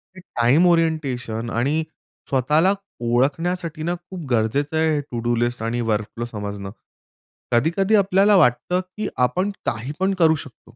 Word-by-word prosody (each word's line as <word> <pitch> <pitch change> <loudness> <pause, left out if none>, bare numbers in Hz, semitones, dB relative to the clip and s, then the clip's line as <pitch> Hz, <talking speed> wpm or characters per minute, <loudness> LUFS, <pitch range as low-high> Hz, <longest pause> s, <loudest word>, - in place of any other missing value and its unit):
ते - - -11
time 140 -1 +2
orientation 135 -9 0
आणि 140 +8 0 0.5
स्वतःला 150 +8 +3 0.4
ओळखण्यासाठी 155 +6 0
ना, 175 +2 -1
खूप 175 -1 -9
गरजेचं 130 +7 +1
आहे 160 0 +2
हे - - 0
टू-डू 120 0 -1
लिस्ट 120 0 -1
आणि 115 +2 -1
वर्क 105 -1 0
फ्लो 120 - -3
समजणं. 100 -3 -6 0.8
कधी-कधी 170 - +2
आपल्याला 200 +1 +4
वाटतं 130 +3 +2 0.2
की 215 -1 -2
आपण 180 - +1
काही 120 +4 -2
पण 190 +1 +1
करू 160 -2 +5
शकतो 130 - -17
145 Hz, 145 wpm, -22 LUFS, 120-175 Hz, 0.8 s, करू